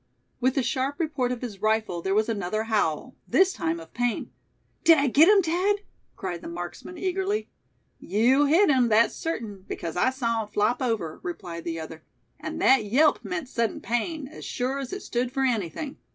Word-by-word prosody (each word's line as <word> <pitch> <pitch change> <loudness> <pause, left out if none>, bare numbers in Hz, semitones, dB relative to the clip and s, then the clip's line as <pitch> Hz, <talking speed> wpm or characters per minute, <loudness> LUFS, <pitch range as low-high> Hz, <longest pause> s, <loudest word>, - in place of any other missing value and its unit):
With 260 +1 +1
the 270 - +2
sharp 265 +5 -1
report 295 -7 0
of 250 0 -4
his 205 -5 -6
rifle 215 -5 0
there 190 +3 0
was 215 +1 +2
another 215 -1 -1
howl, 215 - -1
this 380 0 +4
time 165 +1 -2
of 165 0 -13
pain. 245 -1 -1 0.5
"Did 330 -1 +7
I 280 - +2
get 285 +5 +6
him, 410 -2 +6
Thad?" 370 +5 +1 0.3
cried 180 -4 -5
the - - -8
marksman, 175 - -7
eagerly. 385 +3 -1 0.5
"You 250 +8 +3
hit 330 +4 +5
him, 255 -3 +4
that's 225 +2 +4
certain, 220 - -5
because 165 -2 -5
I 180 +9 +3
saw 230 -4 -1
him 215 - -6
flop 210 +4 0
over," 220 -11 -2
replied 170 -1 -6
the 165 -1 -3
other; 160 0 -8 0.4
"and - - -5
that 265 -4 +5
yelp 275 +9 +3
meant 365 -6 -4
sudden 230 -3 -1
pain, 270 +6 -2
as 310 - -11
sure 260 +2 -2
as 265 -2 -5
it 390 - -5
stood 245 +1 -1
for 270 +1 -1
anything. 250 - -2
240 Hz, 190 wpm, -26 LUFS, 205-285 Hz, 0.5 s, Did